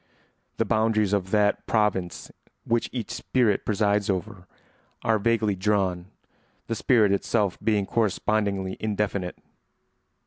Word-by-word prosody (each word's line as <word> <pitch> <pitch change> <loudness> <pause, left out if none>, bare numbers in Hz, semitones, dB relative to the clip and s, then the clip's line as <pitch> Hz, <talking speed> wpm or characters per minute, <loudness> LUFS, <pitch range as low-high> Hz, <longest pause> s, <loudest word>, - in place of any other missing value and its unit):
The 115 - +1
boundaries 110 -2 +1
of 95 -2 0
that 105 0 +1
province 100 -5 0 0.3
which 115 0 0
each 120 -4 -5
spirit 120 -6 +1
presides 105 -1 +1
over 90 -1 -3 0.6
are 110 -1 +2
vaguely 110 -1 +1
drawn, 95 -2 0 0.6
the 115 - -3
spirit 110 -2 +3
itself 100 -1 0
being 105 -3 +2
correspondingly 100 -3 0
indefinite. 100 -4 -2
105 Hz, 110 wpm, -25 LUFS, 95-110 Hz, 0.6 s, spirit